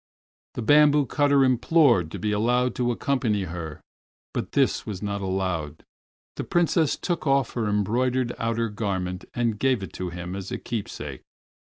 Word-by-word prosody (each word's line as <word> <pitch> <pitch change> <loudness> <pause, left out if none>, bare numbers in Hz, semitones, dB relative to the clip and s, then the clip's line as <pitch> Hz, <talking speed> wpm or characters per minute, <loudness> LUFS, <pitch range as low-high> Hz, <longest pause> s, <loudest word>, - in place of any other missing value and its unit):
The 120 - -3
bamboo 145 +3 +5
cutter 145 0 +3
implored 130 - +4
to - - -6
be 105 - -1
allowed 125 +4 +1
to 120 -1 0
accompany 120 -5 0
her, 85 -3 -6 0.5
but - - -4
this - - +2
was 100 -1 -6
not 100 0 -2
allowed. 95 -6 -2 0.5
The - - -2
Princess 170 -3 +2
took 170 -4 -3
off 135 -2 +2
her 115 -3 -1
embroidered 120 +5 +1
outer 115 0 0
garment 95 -3 -3
and 115 -3 0
gave 130 -5 +1
it - - -8
to 90 -1 -4
him 90 +1 -6
as 95 -1 -6
a - - -2
keepsake. 115 -4 -5
115 Hz, 160 wpm, -25 LUFS, 95-130 Hz, 0.5 s, bamboo